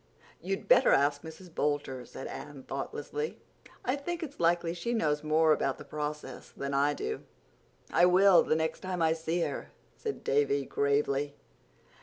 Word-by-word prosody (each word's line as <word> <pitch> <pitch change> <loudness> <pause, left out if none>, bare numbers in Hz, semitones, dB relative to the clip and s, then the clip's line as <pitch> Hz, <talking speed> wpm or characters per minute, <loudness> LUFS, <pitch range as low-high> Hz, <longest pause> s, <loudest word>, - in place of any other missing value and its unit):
"You'd 195 +3 -3
better - - +6
ask 145 +1 +3
Mrs. 160 +2 -11
Boulter," 145 -4 -1
said - - -8
Anne 145 -2 -8
thoughtlessly. 450 - -4 0.5
"I 255 - +2
think 340 +4 -4
it's 290 -2 -8
likely 170 0 +2
she 235 +8 -2
knows 150 -8 +1
more 155 +1 +4
about 135 -2 0
the - - -10
process 150 -3 -5
than 140 0 -5
I 140 +1 +2
do." 435 +1 -3 0.7
"I 175 - +6
will, 185 -1 +7
the - - +1
next 160 0 -1
time 185 -2 -2
I 160 0 +4
see 165 +1 -2
her," - - -3 0.3
said 435 -3 -5
Davy 140 0 +2
gravely. 140 0 0
160 Hz, 160 wpm, -30 LUFS, 145-180 Hz, 0.7 s, will